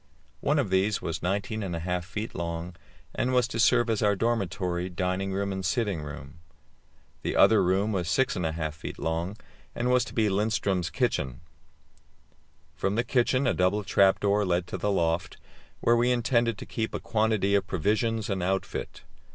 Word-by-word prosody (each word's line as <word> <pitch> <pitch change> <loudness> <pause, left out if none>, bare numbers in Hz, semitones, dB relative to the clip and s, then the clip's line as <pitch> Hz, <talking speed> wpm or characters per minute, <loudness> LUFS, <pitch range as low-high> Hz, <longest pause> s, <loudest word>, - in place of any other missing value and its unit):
One 150 +2 +1
of 125 -10 0
these 95 +3 +2
was 80 -1 -4
19 100 +4 -2
1/2 90 -1 -2
feet 105 +5 -5
long, 85 +1 -4 0.4
and 125 - 0
was 125 -2 +3
to 115 - -4
serve 120 +1 +4
as 110 -2 0
our 105 -1 +3
dormitory, 95 -5 -1
dining 95 +2 -2
room, 100 +1 -1
and 95 0 -4
sitting 95 -2 0
room; 75 +1 -9 0.8
the - - -2
other - - +6
room 95 +4 +1
was 90 -4 -1
6 130 +10 +2
1/2 80 -3 -2
feet 80 - -8
long, 85 +5 -2 0.4
and 125 +1 0
was 125 -1 +4
to - - -10
be 110 - +3
Lindström's 100 -3 0
kitchen. 65 -4 -1 1.3
From 95 +1 -1
the 115 - +2
kitchen 130 +2 +1
a 125 - +3
double 90 +5 +1
trap 100 -1 +4
door 105 0 +2
led 90 -2 0
to - - -3
the 105 - 0
loft, 85 -2 0 0.4
where 120 - +4
we 120 +1 +3
intended 120 -2 +1
to - - -8
keep 110 -2 -3
a - - -2
quantity 110 -3 +1
of 100 -2 +2
provisions 110 +5 0
and 95 -2 -2
outfit. 95 +2 -3
100 Hz, 175 wpm, -27 LUFS, 90-110 Hz, 1.3 s, other